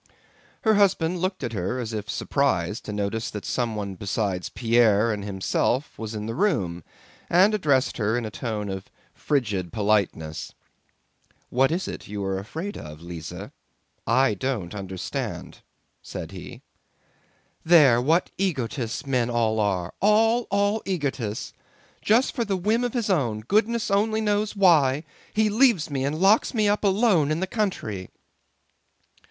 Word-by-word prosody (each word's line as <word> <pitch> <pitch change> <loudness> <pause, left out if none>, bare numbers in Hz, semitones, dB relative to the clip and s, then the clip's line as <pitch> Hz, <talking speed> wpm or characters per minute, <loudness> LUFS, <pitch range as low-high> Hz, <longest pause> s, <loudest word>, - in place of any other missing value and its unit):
Her 220 - +4
husband 185 -4 +2
looked 185 +1 -2
at 115 - -3
her 100 +5 -2
as 115 -3 -4
if 105 -1 -4
surprised 105 -4 0
to - - -5
notice 105 +2 -2
that 105 - -7
someone 110 -5 -2
besides 95 -1 -2
Pierre 115 -2 +3
and 105 -1 -5
himself 100 +7 -1
was 110 0 -5
in 105 0 -4
the 115 - -3
room, 100 - 0 0.5
and 190 +5 +5
addressed 145 -10 +1
her 110 +1 +1
in 120 - -2
a 110 - -5
tone 105 -2 -4
of 95 -1 -6 0.2
frigid 105 - -1
politeness. 100 -7 -1 1.0
"What 130 +3 +3
is 180 +3 -1
it - - -7
you 100 -1 -4
are 95 0 -1
afraid 165 - -6
of, 75 0 -9
Lise? 85 -1 -8 0.6
I 130 -3 +3
don't 105 -5 -3
understand," 95 -2 -5 0.4
said - - -7
he. - - -10 1.0
"There, 145 -8 +6
what 160 +7 +2
egotists 130 - -2
men 125 -3 +1
all 115 -2 +1
are: 95 -4 0
all, 225 +4 +3
all 205 +2 +1
egotists! 140 - -3 0.5
Just 230 +5 +3
for 240 - -1
a 195 - +2
whim 215 +6 +1
of 245 0 -2
his 230 -4 0
own, 120 - 0
goodness 215 - +1
only 215 +2 +2
knows 210 0 0
why, 155 -8 +4 0.3
he 215 0 +3
leaves 210 - +3
me 135 -2 -1
and 145 +3 -1
locks 200 +6 +4
me 215 -2 +3
up 205 +1 +1
alone 195 -6 +3
in 155 +1 0
the 190 - 0
country." 185 - -3
130 Hz, 150 wpm, -25 LUFS, -, 1.0 s, There